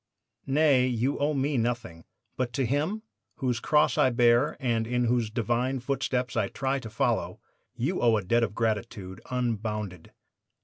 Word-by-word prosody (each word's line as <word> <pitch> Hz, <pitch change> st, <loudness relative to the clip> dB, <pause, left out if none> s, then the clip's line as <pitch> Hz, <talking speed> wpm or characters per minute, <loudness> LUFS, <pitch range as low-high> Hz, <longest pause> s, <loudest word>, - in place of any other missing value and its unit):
"'Nay; 135 Hz, -2 st, +4 dB
you 125 Hz, +3 st, 0 dB
owe 145 Hz, +1 st, +1 dB
me 135 Hz, -1 st, 0 dB
nothing; 115 Hz, -8 st, -3 dB, 0.3 s
but 125 Hz, -2 st, -2 dB
to 135 Hz, -3 st, 0 dB
Him, 155 Hz, -, -1 dB, 0.3 s
whose 125 Hz, -4 st, -1 dB
cross 150 Hz, -1 st, +2 dB
I 130 Hz, -, +5 dB
bear 120 Hz, +3 st, +3 dB
and 115 Hz, -4 st, 0 dB
in 125 Hz, +1 st, 0 dB
whose 120 Hz, -2 st, +1 dB
Divine 120 Hz, +4 st, -1 dB
footsteps 125 Hz, -1 st, -2 dB
I 110 Hz, -4 st, +1 dB
try 135 Hz, +5 st, -2 dB
to 115 Hz, -, -8 dB
follow, 110 Hz, -, -1 dB, 0.4 s
you -, -, -1 dB
owe 115 Hz, -2 st, +4 dB
a 105 Hz, -, -3 dB
debt 120 Hz, +6 st, +2 dB
of 105 Hz, -3 st, -1 dB
gratitude 105 Hz, -4 st, -2 dB
unbounded. 105 Hz, -7 st, -3 dB
120 Hz, 160 wpm, -27 LUFS, 110-135 Hz, 0.4 s, I